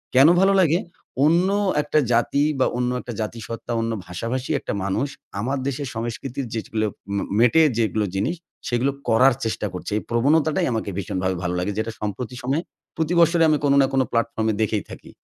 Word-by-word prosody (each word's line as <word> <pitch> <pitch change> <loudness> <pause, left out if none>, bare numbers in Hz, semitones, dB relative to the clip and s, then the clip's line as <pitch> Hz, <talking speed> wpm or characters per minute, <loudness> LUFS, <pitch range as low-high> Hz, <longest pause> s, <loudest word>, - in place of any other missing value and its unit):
কেনো 135 +5 +8
ভালো 195 +1 +5
লাগে? 165 0 +3 0.5
অন্য 170 +4 +4 0.3
একটা 150 +1 +1
জাতি 120 +4 +2 0.2
বা 130 - +4
অন্য 125 0 0
একটা 120 - -7
জাতিসত্ত্বা 115 +2 -5
অন্য 115 0 -1 0.2
ভাষাভাষী 115 +8 -3
একটা - - -4
মানুষ, 100 +8 0 0.3
আমার 130 +6 -1
দেশের 140 +1 -3
সংস্কৃতির 120 +4 -4
যেগুলো 110 -1 -2 0.3
মে 100 - 0 0.2
মেটে, 125 +7 +5 0.2
যেগুলো 110 -2 +1
জিনিস। 105 - 0 0.3
সেগুলো 125 +3 +1 0.2
করার 125 +4 +5
চেষ্টা 110 -1 -2
করছে। 90 - -6
এই - - -3
প্রবণতাটাই 145 +6 +2
আমাকে 110 -2 -2
ভীষণভাবে 95 -1 -2
ভালো 90 0 -1
লাগে। 90 +3 -1
যেটা 110 +1 -2
সম্প্রতি 110 +4 -4
সময়ে 140 +7 0 0.3
প্রতি 160 +1 0
বৎসরই 170 0 +5
আমি 155 - +3
কোনো 140 -1 +4
না 135 - +3
কোনো 135 -1 +3
প্লাটফর্মে 115 -1 0
দেখেই 110 -2 0
থাকি। - - -11
120 Hz, 175 wpm, -23 LUFS, 110-140 Hz, 0.5 s, কেনো